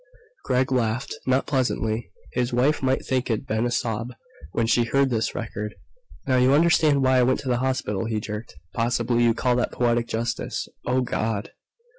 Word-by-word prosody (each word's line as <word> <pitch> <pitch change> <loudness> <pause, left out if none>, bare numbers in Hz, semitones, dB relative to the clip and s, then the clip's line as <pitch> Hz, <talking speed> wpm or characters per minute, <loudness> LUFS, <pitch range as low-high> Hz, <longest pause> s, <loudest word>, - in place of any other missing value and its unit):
Gregg 130 0 +1
laughed, 120 0 0
not 130 +1 +2
pleasantly. 120 -4 -1 0.2
His 125 0 0
wife 130 +6 +2
might 130 0 0
think 130 -1 -1
it'd 115 +4 -1
been 110 0 0
a - - -2
sob, 120 0 -2 0.4
when 115 - 0
she 120 +1 +3
heard 135 +2 +2
this 115 -1 -1
record. 105 -2 -5 0.5
"Now 130 -1 +2
you 130 +2 +5
understand 155 -3 +4
why 130 0 +4
I - - +5
went 130 +1 +2
to 130 - -4
the 120 - +2
hospital," 120 -6 -1
he 110 -1 -1
jerked. 105 -2 -6 0.2
"Possibly 120 0 +1
you'd 115 -1 +2
call 125 -2 +2
that 125 - 0
poetic 120 -1 +1
justice. 115 +1 -3 0.2
Oh, 130 +1 +2
God!" 110 -4 -2
120 Hz, 180 wpm, -24 LUFS, 115-130 Hz, 0.5 s, you